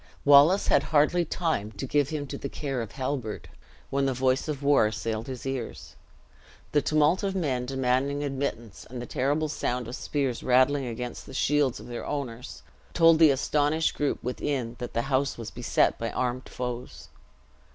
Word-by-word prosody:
Wallace 145 Hz, +7 st, +6 dB
had -, -, +5 dB
hardly 160 Hz, +3 st, +3 dB
time 155 Hz, -, -2 dB
to 100 Hz, +6 st, -5 dB
give 145 Hz, +1 st, +1 dB
him 150 Hz, -2 st, -3 dB
to -, -, -6 dB
the 140 Hz, -, -4 dB
care 135 Hz, -4 st, -3 dB
of 115 Hz, -, -7 dB
Halbert, 130 Hz, -5 st, -4 dB, 0.4 s
when 135 Hz, 0 st, +1 dB
the 135 Hz, -, -1 dB
voice 130 Hz, +2 st, +1 dB
of 145 Hz, -2 st, -4 dB
war 140 Hz, -6 st, +4 dB
assailed 110 Hz, +2 st, -3 dB
his 130 Hz, -2 st, -7 dB
ears. 135 Hz, -4 st, -5 dB, 0.8 s
The 145 Hz, -, +3 dB
tumult 155 Hz, +5 st, +2 dB
of 195 Hz, -1 st, -2 dB
men 130 Hz, -9 st, -1 dB
demanding 135 Hz, +2 st, 0 dB
admittance 135 Hz, -6 st, -4 dB
and 125 Hz, 0 st, -6 dB
the 120 Hz, -, -5 dB
terrible 145 Hz, +6 st, 0 dB
sound 125 Hz, -5 st, -2 dB
of 120 Hz, -, -5 dB
spears 135 Hz, -5 st, -2 dB
rattling 130 Hz, +2 st, +3 dB
against 120 Hz, +1 st, -6 dB
the 135 Hz, -, -9 dB
shields 145 Hz, -2 st, +1 dB
of -, -, -11 dB
their 120 Hz, -1 st, -6 dB
owners, 125 Hz, -4 st, -5 dB, 0.3 s
told 165 Hz, -2 st, +6 dB
the 160 Hz, -2 st, +8 dB
astonished 145 Hz, +3 st, +1 dB
group 145 Hz, -, -1 dB
within 125 Hz, -1 st, -2 dB
that 120 Hz, -, -6 dB
the 115 Hz, -, +1 dB
house 135 Hz, +1 st, 0 dB
was 115 Hz, -1 st, -7 dB
beset 120 Hz, 0 st, +1 dB
by 115 Hz, -, -2 dB
armed 125 Hz, 0 st, -2 dB
foes. 125 Hz, -1 st, -6 dB
135 Hz, 175 wpm, -27 LUFS, 125-145 Hz, 0.8 s, the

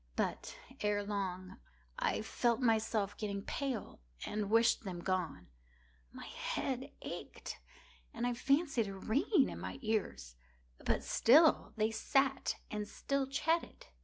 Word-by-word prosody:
But, -, -, -2 dB, 0.2 s
ere 205 Hz, -1 st, +1 dB
long, 190 Hz, -2 st, -4 dB, 0.4 s
I -, -, +1 dB
felt 235 Hz, +1 st, +1 dB
myself 220 Hz, -4 st, +1 dB
getting 200 Hz, -2 st, -3 dB
pale 265 Hz, -, -3 dB, 0.3 s
and 210 Hz, -1 st, -2 dB
wished 230 Hz, +1 st, +4 dB
them 180 Hz, -4 st, -5 dB
gone. 175 Hz, -, -1 dB, 0.7 s
My -, -, -9 dB
head 265 Hz, +1 st, -3 dB
ached, -, -, -7 dB, 0.5 s
and 235 Hz, -, -3 dB
I 245 Hz, -, +1 dB
fancied 275 Hz, -2 st, +2 dB
a 195 Hz, -, -5 dB
ringing 275 Hz, -, +2 dB
in -, -, -6 dB
my -, -, -5 dB
ears: 210 Hz, -, -2 dB, 0.5 s
but -, -, +1 dB
still 305 Hz, +7 st, +5 dB
they 215 Hz, +1 st, +2 dB
sat 270 Hz, +4 st, +1 dB, 0.2 s
and 210 Hz, -1 st, -3 dB
still 275 Hz, +3 st, -1 dB
chatted. 325 Hz, -, 0 dB
220 Hz, 130 wpm, -35 LUFS, 200-270 Hz, 0.7 s, still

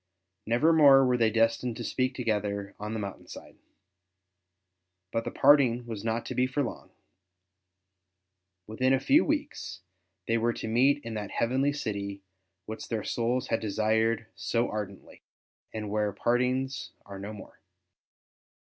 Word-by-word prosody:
Nevermore 140 Hz, +2 st, +6 dB
were 125 Hz, -1 st, +2 dB
they 115 Hz, -2 st, +3 dB
destined 115 Hz, +1 st, +1 dB
to -, -, -5 dB
speak 130 Hz, 0 st, -1 dB
together 105 Hz, -4 st, -2 dB
on 105 Hz, +1 st, -4 dB
the 110 Hz, -, -3 dB
moun 100 Hz, -2 st, -5 dB
tain -, -, -20 dB
side. -, -, -11 dB, 1.5 s
But 115 Hz, 0 st, -2 dB
the -, -, -2 dB
parting 135 Hz, -4 st, +4 dB
was 110 Hz, -3 st, -6 dB
not 115 Hz, +1 st, -1 dB
to -, -, -4 dB
be 125 Hz, 0 st, +2 dB
for 140 Hz, +3 st, -1 dB
long; 120 Hz, -, -6 dB, 1.8 s
within 130 Hz, +5 st, +1 dB
a -, -, 0 dB
few 280 Hz, -, +4 dB
weeks 290 Hz, -, -3 dB, 0.5 s
they 115 Hz, 0 st, +2 dB
were 120 Hz, +1 st, +1 dB
to -, -, -6 dB
meet 135 Hz, +6 st, +3 dB
in 115 Hz, -, -5 dB
that 105 Hz, -2 st, -4 dB
heavenly 130 Hz, +4 st, +1 dB
city 100 Hz, -7 st, -4 dB, 0.4 s
which 110 Hz, +1 st, -7 dB
their 110 Hz, -3 st, -2 dB
souls 120 Hz, +1 st, -1 dB
had 115 Hz, -, +1 dB
desired 110 Hz, +2 st, +1 dB
so 120 Hz, +1 st, -1 dB
ardently, 100 Hz, -3 st, -7 dB, 0.5 s
and 105 Hz, -2 st, -5 dB
where 105 Hz, -1 st, 0 dB
partings 125 Hz, +4 st, -1 dB
are 100 Hz, -1 st, -9 dB
no 100 Hz, +2 st, -6 dB
more. 105 Hz, -2 st, -12 dB
115 Hz, 150 wpm, -28 LUFS, 105-130 Hz, 1.8 s, Nevermore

